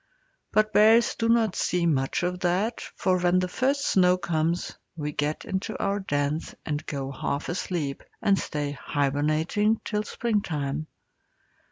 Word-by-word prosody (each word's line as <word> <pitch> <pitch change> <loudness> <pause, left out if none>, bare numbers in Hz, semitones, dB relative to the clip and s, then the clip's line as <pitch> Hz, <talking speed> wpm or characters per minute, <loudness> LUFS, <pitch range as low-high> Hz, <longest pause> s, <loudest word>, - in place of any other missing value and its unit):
But 215 0 +2
bears 225 +3 +6
do 230 0 -1
not 230 -4 +3
see 180 -1 0
much 140 +1 +1
of 180 0 -1
that, 190 +6 0
for 185 -1 +1
when 175 0 +3
the 185 0 +1
first 275 +8 0
snow 180 -1 +4
comes 170 -1 -1 0.2
we 150 -2 -3
get 150 +1 -2
into 195 +3 -3
our 200 0 0
dens 145 -3 -2
and 150 -1 -2
go 135 -2 -3
half 140 +1 -3
asleep, 170 -5 -2 0.2
and 200 -1 +3
stay 145 -2 -3
hibernating 155 - 0
till 210 -2 0
springtime. 155 - -2
175 Hz, 145 wpm, -26 LUFS, 150-210 Hz, 0.2 s, bears